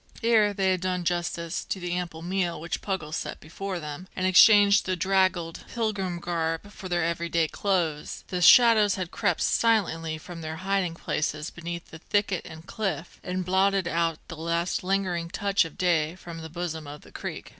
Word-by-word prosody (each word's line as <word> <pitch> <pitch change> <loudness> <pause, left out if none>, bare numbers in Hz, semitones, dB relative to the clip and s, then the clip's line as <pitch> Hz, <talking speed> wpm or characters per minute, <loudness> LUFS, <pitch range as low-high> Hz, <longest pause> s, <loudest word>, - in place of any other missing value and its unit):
Ere 220 -3 +4
they 190 -1 +1
had 185 -1 0
done 180 -1 -1
justice 170 -1 -2
to 190 - -4
the 175 -1 -3
ample 170 -2 -4
meal 180 -1 -1
which 170 +1 -4
Puggles 175 -6 -3
set - - -5
before 185 +3 -5
them, 150 +3 -7
and 185 - -1
exchanged 200 +2 +7
the 185 - +1
draggled 185 -2 +1
pilgrim 205 -6 -2
garb 165 +2 -2
for 190 -3 -9
their 175 -2 +1
everyday 170 -1 0
clothes, 170 -6 -1
the 180 -1 -2
shadows 215 0 +7
had 185 -3 -4
crept 190 -7 0
silently 165 -8 +1
from 165 +2 -9
their 160 0 -5
hiding 195 -4 0
places 155 -1 -2
beneath 170 0 -6 0.2
thicket 205 -3 0
and 160 +1 -11
cliff, 190 -6 -4
and 180 0 -3
blotted 190 0 +2
out 165 -1 0
the 165 - -7
last 170 +3 -1
lingering 180 -3 -1
touch 200 0 +1
of 160 - -10
day 170 -3 +1
from 170 -2 -9
the 160 - -8
bosom 160 -2 -5
of 145 0 -9
the - - -17
creek. - - -6
175 Hz, 175 wpm, -26 LUFS, 165-195 Hz, 0.2 s, exchanged